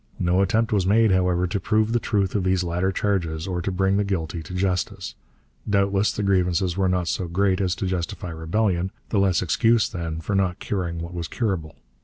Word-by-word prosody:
No 90 +2 +2
attempt 110 +4 +1
was 95 -3 +2
made, 110 +1 +4
however, 90 -1 +2
to 100 +3 -2
prove 110 +3 +1
the 120 - +3
truth 100 -4 0
of 100 - 0
these 95 -1 +1
latter 90 +2 0
charges 90 -5 -1
or 90 -2 -2
to 95 - -2
bring 95 +1 +1
the 105 - +2
guilty 85 -4 -3
to 85 +3 -8
justice. 90 -1 -1 0.6
Doubtless 100 0 +2
the 105 - -3
grievances 90 -2 +1
were 95 -1 +1
not 90 -1 0
so 90 +2 -1
great 95 +2 +1
as 95 -1 0
to 100 - -3
justify 90 -1 -3
rebellion; 90 +3 0 0.2
the 105 - +1
less 95 -3 +2
excuse, 115 +5 +3
then, 85 -3 -4
for 80 +5 -4
not 95 -2 +1
curing 85 -4 -3
what 85 +1 -7
was 85 -2 -4
curable. 95 -10 -2
95 Hz, 205 wpm, -24 LUFS, 85-100 Hz, 0.6 s, made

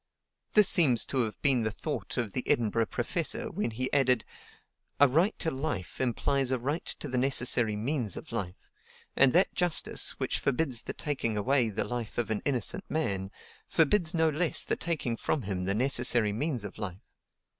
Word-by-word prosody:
This 210 -3 +7
seems 130 -9 +4
to 135 - -2
have 110 - -7
been 135 -4 +4
the 110 - 0
thought 145 +7 -5
of 115 -5 -2
the 125 - -1
Edinburgh 115 -1 +1
professor 180 - -1
when 195 - -2
he 130 +3 -2
added: 130 -4 +2 0.7
"A 145 - +7
right 165 +10 +1
to 160 - -2
life 135 - -4
implies 130 +3 0
a 130 - +1
right 145 +7 -3
to - - -5
the 130 -2 -1
necessary 120 -4 +2
means 115 - -2
of - - -10
life; 95 -6 -6 0.4
and 135 -1 +5
that 180 +3 +3
justice, 175 -2 +2
which - - -1
forbids 130 -3 0
the - - -6
taking 125 -7 -3
away 125 +2 +2
the 110 +1 -2
life 120 -3 -5
of 120 -2 -1
an 105 - -1
innocent 130 -6 0
man, 100 -12 -2 0.4
forbids 170 +2 +2
no 160 -1 +3
less 160 +3 +1
the - - -1
taking 145 -9 -3
from 145 - -2
him 95 -2 -3
the 100 +1 0
necessary 120 -3 +2
means 125 0 -2
of 105 +1 -8
life. 95 -3 -5
125 Hz, 180 wpm, -29 LUFS, 110-150 Hz, 0.7 s, This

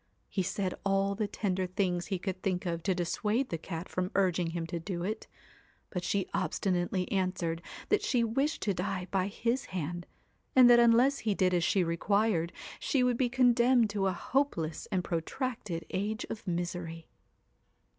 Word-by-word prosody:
He 195 - 0
said 190 0 -1
all 195 0 +2
the 210 +1 -1
tender 190 -3 -1
things 180 -1 -1
he 195 - -1
could 185 0 -4
think 185 -2 -1
of 170 -1 -2
to 185 +2 0
dissuade 210 +8 0
the 165 - -2
cat 165 +1 -6
from 185 0 -2
urging 180 -3 +2
him 165 0 -3
to 170 +1 -4
it; 215 +4 -3 0.6
but 180 -2 -3
she 200 +1 0
obstinately 180 -1 0
answered 185 -4 -1 0.3
that 420 - +3
she 245 -3 +2
wished 270 +8 0
to 200 - +1
die 185 0 -3
by 190 -1 +1
his 235 +5 -1
hand, 175 0 -4 0.5
and 255 -2 +9
that 240 - +8
unless 240 +4 +5
he 215 -3 0
did 185 -1 +2
as 175 -1 +2
she 185 +3 +3
required, 175 +1 +1 0.3
she 265 -3 +1
would 250 -1 +3
be 250 -1 +2
condemned 245 -2 +4
to 200 -1 0
a - - +2
hopeless 175 - -1
and 185 -2 +1
pro 170 -2 0
tracted 210 - -4
age 210 +3 -2
of 215 - -7
misery. 170 -2 -3
190 Hz, 175 wpm, -31 LUFS, 175-220 Hz, 0.6 s, and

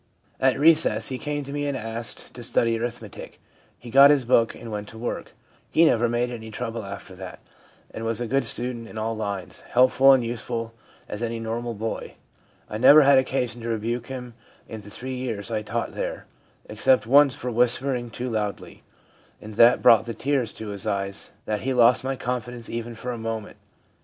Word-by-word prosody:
At 130 0 +3
recess 150 -8 +3
he 130 -1 -4
came 145 -1 -3
to 140 +1 -8
me 145 0 -2
and 140 -2 -2
asked 115 -1 -4
to 120 - -9
study 115 0 +1
arithmetic. 115 -3 -7 0.4
He 120 - -11
got 140 +2 +8
his 145 -4 +3
book 115 -1 +3
and 115 - -9
went 105 0 -5
to 110 - -11
work. 120 +2 -5 0.4
He 165 - +4
never 120 -5 +3
made 120 +1 0
any 110 -2 -7
trouble 115 +1 -5
after 100 -1 -9
that, 95 -1 -8 0.6
and 110 - -6
was 115 0 -1
a 120 - -2
good 135 +3 +1
student 120 0 -1
in 110 - -10
all 110 +1 -2
lines, 100 -4 -5
helpful 130 +2 +6
and 130 -2 +3
useful 115 0 -4 0.3
as 105 - -6
any 115 -1 -3
normal 115 +1 -4
boy. 110 +2 -5 0.5
I 105 - -5
never 145 +5 +8
had 140 -1 +6
occasion 125 -3 -2
to 115 - -5
rebuke 115 +2 -2
him 125 -2 -7 0.3
in 110 -2 -8
the 105 - -12
three 130 +5 -6
years 115 -4 -4
I 110 -1 -1
taught 115 +2 -3
there, - - -4 0.4
except 110 +2 +2
once 140 +2 +5
for 125 - -5
whispering 125 +1 +1
too 120 +3 -5
loudly, 105 -5 -4 0.6
and 110 0 -10
that 115 +3 +5
brought 115 -1 +6
the 115 -1 -5
tears 135 -5 -1
to 110 -1 -7
his 100 +1 -5
eyes 100 -1 -2 0.2
that 105 -1 -2
he 135 - -3
had 130 - -1
lost 120 0 +5
my 135 +1 -2
confidence 125 -2 -5
even 115 0 -5
for 125 +2 -5
a 120 - -5
moment 115 -1 -5
115 Hz, 195 wpm, -24 LUFS, 110-125 Hz, 0.6 s, got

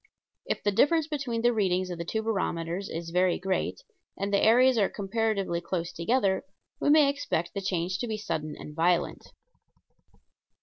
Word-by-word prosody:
If - - -2
the 205 - +2
difference 310 +9 +3
between 275 -7 -3
the 240 0 +4
readings 185 -4 0
of 175 - -6
the - - -2
two 220 +5 -2
barometers 185 -3 -2
is 165 0 -5
very 180 0 +2
great, 190 - -2 0.3
and 200 +1 -2
the 200 - +3
areas 250 +3 +6
are 200 - +3
comparatively 200 -3 -1
close 170 -1 -3
together, 195 +2 +1 0.4
we - - +1
may 300 -1 +6
expect 275 - -2
the 200 - -3
change 185 -1 -1
to 240 - -2
be 220 -1 -2
sudden 155 -7 -4
and 150 - -10
violent. 175 +2 +1
195 Hz, 170 wpm, -28 LUFS, 175-230 Hz, 0.4 s, areas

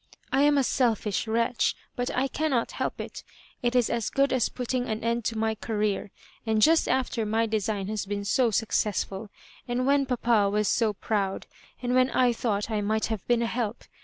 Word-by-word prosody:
^'I 270 - +4
am 295 -1 +4
a 275 - +4
selfish 225 -5 0
wretch, 230 +1 +1 0.2
but 245 0 -2
I 265 +2 +2
cannot 275 -4 0
help - - -3
it - - -7 0.4
It 240 -1 0
is 245 -2 +4
as 235 -2 -1
good 275 0 +2
as 255 -3 +2
putting 250 0 -2
an 220 0 -3
end 235 0 0
to 225 - -1
my 220 0 +1
Career; 210 -2 -2 0.3
and 220 -1 +1
just 320 +8 +4
after 255 -3 0
my 220 +2 +1
design 210 -2 -1
has 210 -2 -3
been 200 0 -3
so 245 +4 +3
8UOoessful*~and 215 +3 -2
when 275 0 +3
papa 235 -5 +2
was 210 +1 +1
so 225 -3 +2
proud 200 -1 -2 0.2
— - - -28
and 245 0 0
when 255 0 +4
I 250 -1 +3
thought 220 -2 -2
I 215 -1 0
might 215 +2 0
have 210 - -5
been 240 -1 +3
a - - +1
help. 230 -1 -3
230 Hz, 195 wpm, -27 LUFS, 210-250 Hz, 0.4 s, ^'I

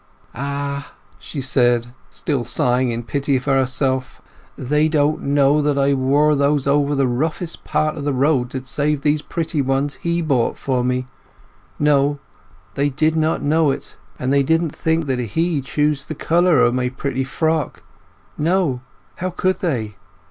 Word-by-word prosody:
"Ah!" 140 +2 -4 0.3
she 145 - -6
said, 120 -2 +2 0.2
still 140 -5 -2
sighing 125 +1 +1
in 120 0 -3
pity 140 +3 -1
of 130 - -1
herself, 130 -1 0 0.4
"they 150 +4 +1
didn't 150 0 +1
know 140 +1 +3
that 145 -1 +1
I 140 0 +3
wore 140 +3 +3
those 140 -1 +1
over 145 +1 +2
the 135 -1 +2
roughest 155 +7 -2
part 155 0 0
of 150 - -6
the 145 - 0
road 135 -2 +1
to 130 0 -6
save 145 +1 -1
these 150 +1 +1
pretty 160 -1 -2
ones 135 +2 -1
he 170 0 0
bought 135 -7 +1
for 130 -2 -1
me—no—they 140 +3 -3
did 155 +3 +1
not 160 -1 0
know 155 +1 +3
it! 135 - -4 0.2
And 130 +2 -1
they 140 - +4
didn't 160 +2 +1
think 160 0 0
that 130 -2 -1
he 155 - -1
chose 150 +1 0
the 155 - -6
colour 170 -1 +3
o' 120 - +4
my 125 0 0
pretty 135 0 -3
frock—no—how 155 +1 -3
could 185 +1 -1
they? 115 - -2
140 Hz, 150 wpm, -20 LUFS, 130-155 Hz, 0.4 s, they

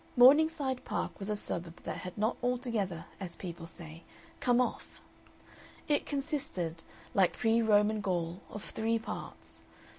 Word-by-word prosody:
Morningside 275 0 +6
Park - - -3
was 200 +1 -3
a 210 - +1
suburb 170 -4 -4
that - - -3
had 180 -1 -7
not 215 +3 +2
altogether, 230 -9 -1
as 180 -3 -2
people 170 -2 -6
say, 165 0 -9 0.4
come 245 -1 +3
off. 250 - -1 0.9
It 295 -1 +2
consisted, 275 - -2 0.3
like 190 -3 +3
pre 225 0 +3
Roman 210 -1 +4
Gaul, 175 -2 -1
of 210 - -7
three 225 +1 0
parts. 225 - -7
210 Hz, 140 wpm, -32 LUFS, 175-250 Hz, 0.9 s, Morningside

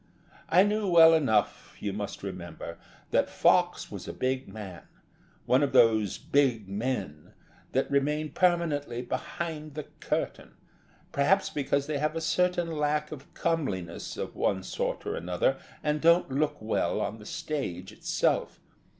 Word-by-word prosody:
I 180 +3 +6
knew 210 0 0
well 165 -2 +8
enough, 130 -10 +1
you 100 -2 -3
must 100 -1 -5
remember, 85 -3 -7 0.3
that - - +2
Fox - - +2
was - - -7
a - - -5
big 130 +1 -1
man 95 -4 -8 0.6
one 130 +2 +4
of 140 -2 +1
those 110 -5 +4
big 125 -8 +1
men 100 - -4 0.4
that - - 0
remain 150 +2 +1
permanently 150 -9 +1
behind 155 +3 -5
the 150 - -4 0.2
curtain, - - -3 0.6
perhaps 190 +8 +2
because 140 -1 0
they 150 -1 -2
have 155 +2 0
a - - 0
certain 175 +1 +1
lack 150 0 0
of 145 -2 -9
comeliness 100 - -2
of - - -5
one 95 -1 0
sort - - -3
or - - -2
another 90 +10 0 0.2
and 150 0 0
don't 170 -3 +4
look 150 +2 0
well 110 +1 0
on 110 +2 -3
the 105 - -12
stage 95 - -4
itself. - - 0
140 Hz, 145 wpm, -28 LUFS, 105-155 Hz, 0.6 s, well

